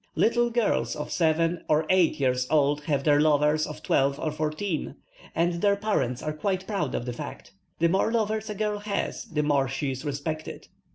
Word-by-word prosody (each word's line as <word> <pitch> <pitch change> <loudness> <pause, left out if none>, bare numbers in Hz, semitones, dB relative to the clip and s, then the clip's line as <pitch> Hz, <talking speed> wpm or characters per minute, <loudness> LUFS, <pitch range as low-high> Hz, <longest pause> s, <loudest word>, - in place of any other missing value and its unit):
Little 240 +1 +3
girls 235 -2 0
of 150 - -5
seven 165 +1 +1
or 155 +1 +3
eight 185 -5 +3
years 125 -2 +1
old 145 -1 +2
have 145 -3 0
their 145 0 +4
lovers 150 0 +3
of 150 - -9
twelve 140 +1 +2
or 155 - -1
fourteen, 155 +3 -3 0.4
and 170 +1 +1
their 200 -1 +4
parents 200 - -1
are 155 - -2
quite 190 +4 -2
proud 190 - -2
of 120 - -3
the 125 - -3
fact. 120 - -8 0.3
The 170 - +3
more 190 +6 +2
lovers 220 -1 -1
a 210 - -4
girl 210 0 -1
has 205 -1 -3
the 150 -2 -1
more 140 -2 +2
she 135 +2 -2
is 130 +1 -6
respected. 155 +2 -5
155 Hz, 190 wpm, -26 LUFS, 145-200 Hz, 0.4 s, their